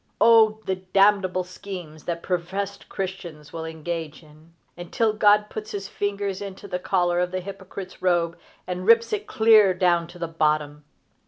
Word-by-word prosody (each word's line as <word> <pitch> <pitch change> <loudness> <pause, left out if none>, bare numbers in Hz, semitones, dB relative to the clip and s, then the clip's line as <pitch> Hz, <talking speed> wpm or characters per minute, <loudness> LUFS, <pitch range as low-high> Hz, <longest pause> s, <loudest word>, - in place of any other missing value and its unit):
O 220 -2 +6
the 190 - -1
damnable 190 0 +2
schemes 180 -4 -9
that 170 -1 -3
professed 190 +3 -3
Christians 175 -6 -6
will 165 -1 -5
engage 160 0 -5
in 155 +2 -19 0.2
until 210 +6 -1
God 210 0 +4
puts 215 0 -7
his 200 -1 -4
fingers 200 -1 -3
into 200 0 -8
the 180 -2 -3
collar 175 -2 +1
of 180 0 0
the 185 +1 -3
hypocrite's 190 0 -9
robe 175 -2 +1 0.3
and 180 +1 -5
rips 230 - +5
it 420 -1 -3
clear 215 -4 +5
down 175 -2 +2
to 175 +1 -13
the 170 -1 -3
bottom! 150 -2 -1
185 Hz, 160 wpm, -24 LUFS, 170-200 Hz, 0.3 s, O